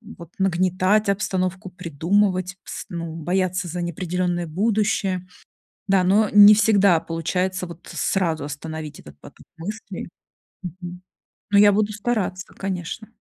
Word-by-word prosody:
вот 170 Hz, -2 st, -12 dB
нагнетать 185 Hz, +2 st, +2 dB
обстановку, 185 Hz, -1 st, -1 dB
придумывать, 185 Hz, +2 st, 0 dB
пс -, -, -7 dB
ну, 170 Hz, -2 st, -5 dB
бояться 185 Hz, +3 st, -1 dB
за 175 Hz, +1 st, -4 dB
неопределенное 175 Hz, +1 st, -2 dB
будущее. 195 Hz, +1 st, 0 dB, 0.6 s
Да, 190 Hz, -1 st, +4 dB
но 205 Hz, +3 st, +3 dB
не 205 Hz, 0 st, +9 dB
всегда 200 Hz, -5 st, +4 dB
получается 180 Hz, +3 st, -2 dB
вот 170 Hz, 0 st, -12 dB
сразу 165 Hz, -6 st, -1 dB
остановить 150 Hz, 0 st, -7 dB
этот 75 Hz, -1 st, -15 dB
поток -, -, -15 dB
мыслей, 200 Hz, +2 st, -6 dB, 0.6 s
мгм, 180 Hz, 0 st, -8 dB, 0.5 s
но 200 Hz, -, +5 dB
я 205 Hz, 0 st, +7 dB
буду 210 Hz, +1 st, +1 dB
стараться, 205 Hz, -4 st, -2 dB
конечно. 190 Hz, +2 st, -5 dB
185 Hz, 125 wpm, -22 LUFS, 170-200 Hz, 0.6 s, не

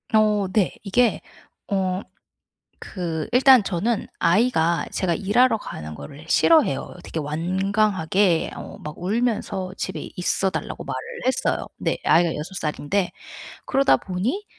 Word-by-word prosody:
어 210 Hz, -2 st, +3 dB
네. 200 Hz, -2 st, +1 dB
이게 230 Hz, +3 st, +2 dB, 0.5 s
어 190 Hz, -2 st, 0 dB, 0.8 s
그 165 Hz, -5 st, -4 dB
일단 255 Hz, -2 st, +7 dB
저는 200 Hz, +5 st, -1 dB
아이가 170 Hz, -4 st, +2 dB
제가 175 Hz, -3 st, 0 dB
일하러 225 Hz, +6 st, +3 dB
가는 80 Hz, -, -8 dB
거를 140 Hz, -, -10 dB
싫어해요. 310 Hz, -, +3 dB
되게 165 Hz, -, -5 dB
완강하게 185 Hz, +3 st, +1 dB
어 -, -, -9 dB
막 150 Hz, 0 st, -7 dB
울면서 200 Hz, -2 st, -1 dB
집에 -, -, -5 dB
있어 190 Hz, +1 st, 0 dB
달라고 -, -, -5 dB
말을 -, -, -4 dB, 0.3 s
했어요. 260 Hz, -, 0 dB
네. -, -, -1 dB
아이가 170 Hz, +2 st, +5 dB
6 155 Hz, +6 st, -6 dB
살인데 175 Hz, +4 st, -1 dB, 0.6 s
그러다 275 Hz, 0 st, +4 dB
보니 215 Hz, -, -3 dB
190 Hz, 250 characters per minute, -23 LUFS, 170-220 Hz, 0.8 s, 일단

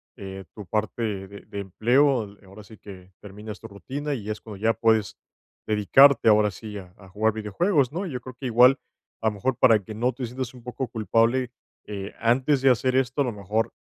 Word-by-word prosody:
eh, 95 Hz, -1 st, -8 dB
tu 105 Hz, -, -9 dB
parte 110 Hz, +5 st, -2 dB, 0.2 s
de 100 Hz, +1 st, -11 dB
de 100 Hz, -, -7 dB
empleo, 115 Hz, +3 st, +1 dB
ahora 100 Hz, +2 st, -13 dB
sí 110 Hz, +2 st, -15 dB
que, 95 Hz, -2 st, -12 dB
terminas 105 Hz, +1 st, -9 dB
tu -, -, -10 dB
rutina, 140 Hz, +8 st, -5 dB
y 105 Hz, -5 st, -8 dB
es 105 Hz, -, -6 dB
cuando 105 Hz, -3 st, -10 dB
ya 110 Hz, +3 st, +2 dB
puedes 110 Hz, -3 st, +1 dB, 0.5 s
dedicarte, 115 Hz, +5 st, +5 dB
ahora 105 Hz, 0 st, +4 dB
sí, 105 Hz, +1 st, -8 dB
a 90 Hz, -1 st, -14 dB
a 95 Hz, -2 st, -16 dB
jugar 110 Hz, +3 st, 0 dB
videojuegos, 125 Hz, -, 0 dB
¿no? 185 Hz, +5 st, -3 dB
Y -, -, -6 dB
yo 125 Hz, -, -4 dB
creo 130 Hz, +1 st, -10 dB
que 135 Hz, -, -4 dB
igual, 125 Hz, +3 st, +6 dB, 0.4 s
a 110 Hz, -, 0 dB
lo 110 Hz, -, +1 dB
mejor, 120 Hz, +6 st, -1 dB
para 115 Hz, -4 st, +6 dB
que 110 Hz, -, -8 dB
no 120 Hz, +4 st, 0 dB
te 125 Hz, +1 st, -5 dB
sientas 125 Hz, +1 st, -6 dB
un 125 Hz, -, -14 dB
poco 125 Hz, +1 st, -4 dB
culpable, 115 Hz, +3 st, +1 dB, 0.3 s
eh, 100 Hz, -1 st, -6 dB
antes 130 Hz, +4 st, +2 dB
de 135 Hz, -, +6 dB
hacer 125 Hz, +1 st, +1 dB
esto, 130 Hz, +2 st, +1 dB
a -, -, +4 dB
lo 125 Hz, -, -2 dB
mejor, 105 Hz, +2 st, -2 dB
110 Hz, 210 wpm, -25 LUFS, 105-130 Hz, 0.5 s, igual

